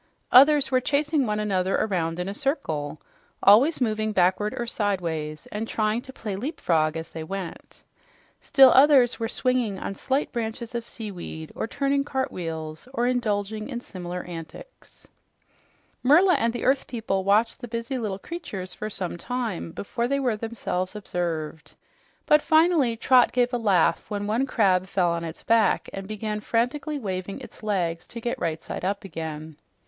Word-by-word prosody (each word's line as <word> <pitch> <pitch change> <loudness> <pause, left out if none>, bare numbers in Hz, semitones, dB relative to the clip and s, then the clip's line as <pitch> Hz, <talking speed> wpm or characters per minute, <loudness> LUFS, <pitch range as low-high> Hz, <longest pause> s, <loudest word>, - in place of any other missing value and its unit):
Others 280 +1 +7
were 255 -1 +3
chasing 290 0 +1
one 210 0 -1
another 195 -3 0
around 170 -5 0
in 180 +1 -3
a 200 - -3
circle, 160 - -2 0.4
always 245 +11 +6
moving 215 -3 0
backward 190 +5 +2
or 240 - -2
sidewise, 170 -9 -2
and 215 +2 -3
trying 215 +1 0
to 260 - -11
play 215 -6 -5
"leapfrog" 165 - 0
as 160 +1 -7
they 160 - -6
went. 190 +1 -7 0.6
Still 270 -2 +7
others 265 -3 +5
were 225 - -1
swinging 250 -5 0
on 195 - -4
slight 270 +8 -1
branches 230 0 -4
of 235 -1 -4
seaweed 180 -7 -7
or - - -3
turning 275 +3 0
cartwheels 165 - -4
or 240 - +1
indulging 215 -3 -1
in 245 -3 -4
similar 180 -5 -6
antics. 175 - -11 0.9
Merla 340 +8 +6
and 230 -6 +2
the 240 - -4
earth 265 +1 +2
people 215 -5 -2
watched 210 +6 +2
the 245 - -6
busy 230 +3 -3
little 210 -5 -3
creatures 195 - -6
for 215 - -5
some 185 -4 -4
time 235 -9 -3
before 235 +7 -3
they 280 +2 0
were 250 -5 +1
themselves 210 -4 -3
observed, 165 -6 -4 0.5
but 300 0 +5
finally 315 -7 +3
Trot 250 +1 +5
gave 245 0 +1
a - - +2
laugh 180 -6 +2
when 205 -1 -3
one 230 +6 0
crab 190 -7 +2
fell 180 -3 +1
on 170 0 -2
its 165 0 -7
back 225 -3 +2
and 195 0 -6
began 215 0 -3
frantically 250 +8 -1
waving 195 -5 -4
its - - -12
legs 180 -6 -1
to 235 - -8
get 240 +1 -3
right 165 -2 -2
side - - -6
up 200 +2 -1
again. 160 -4 -6
215 Hz, 165 wpm, -25 LUFS, 180-250 Hz, 0.9 s, Others